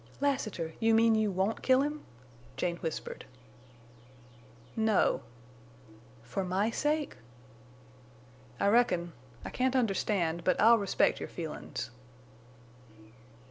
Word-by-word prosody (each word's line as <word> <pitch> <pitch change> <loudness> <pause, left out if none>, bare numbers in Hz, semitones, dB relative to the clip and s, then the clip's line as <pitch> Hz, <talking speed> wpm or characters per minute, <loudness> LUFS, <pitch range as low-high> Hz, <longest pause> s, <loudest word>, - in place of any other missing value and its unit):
"Lassiter! 215 - -1
You 225 0 +4
mean 225 0 +5
you 220 -1 +2
won't 195 +3 -1
kill 260 0 +4
him?" 295 +1 -3 0.6
Jane 170 +4 -1
whispered. 160 -2 -5 1.5
"No." 220 -3 +2 1.0
"For 125 +12 -3
my 190 +5 0
sake?" 295 - -1 1.4
"I - - +1
reckon. 180 -7 +2 0.3
I - - -5
can't 260 +1 0
understand, 195 -7 0
but 185 - +2
I'll 230 +2 +6
respect 200 -2 +1
your - - -6
feelin's." 160 -6 -6
215 Hz, 100 wpm, -30 LUFS, 180-235 Hz, 1.5 s, I'll